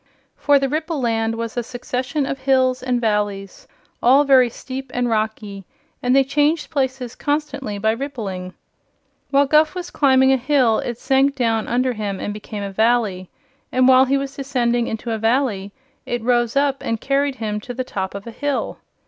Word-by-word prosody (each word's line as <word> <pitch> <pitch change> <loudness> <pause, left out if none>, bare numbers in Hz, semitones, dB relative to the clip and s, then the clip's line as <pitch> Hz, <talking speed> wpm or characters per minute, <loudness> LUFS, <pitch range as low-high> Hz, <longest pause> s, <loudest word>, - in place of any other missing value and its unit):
For 290 0 +3
the 275 0 +1
Ripple 310 +2 -2
Land 225 -2 0
was 230 -1 -5
a 240 - 0
succession 255 +4 -3
of 270 0 -4
hills 260 -1 +2
and 250 -1 0
valleys, 205 -3 -2 0.3
all 265 +4 +5
very 260 -3 +5
steep 260 +2 -7
and 245 0 +1
rocky, 215 -3 -2 0.4
and 250 +1 +2
they 270 - +6
changed 295 +4 0
places 260 -3 -2
constantly 280 -6 -3
by 220 +2 +1
rippling. 215 -8 -5 0.7
While 280 +1 +4
Guph 305 +3 +3
was 360 -1 -6
climbing 265 -2 +4
a - - +3
hill 255 -4 +2
it 240 -2 -4
sank 270 +2 +2
down 225 -4 0
under 250 +1 +1
him 205 -3 -4
and 205 - -4
became 210 0 -7
a 200 - -4
valley, 215 -4 +1 0.4
and 255 0 +3
while 260 0 +7
he 275 +1 +1
was 275 0 -4
descending 245 -4 0
into 225 +1 -4
a 220 - -2
valley 225 -4 0 0.4
it 240 -2 -2
rose 240 0 +1
up 280 -1 +1
and 230 -1 -2
carried 275 +1 0
him 215 -3 -3
to 230 - -8
the 255 - -2
top 190 -5 -4
of 200 - -7
a 235 - -7
hill. 285 +4 -3
250 Hz, 180 wpm, -20 LUFS, 225-275 Hz, 0.7 s, while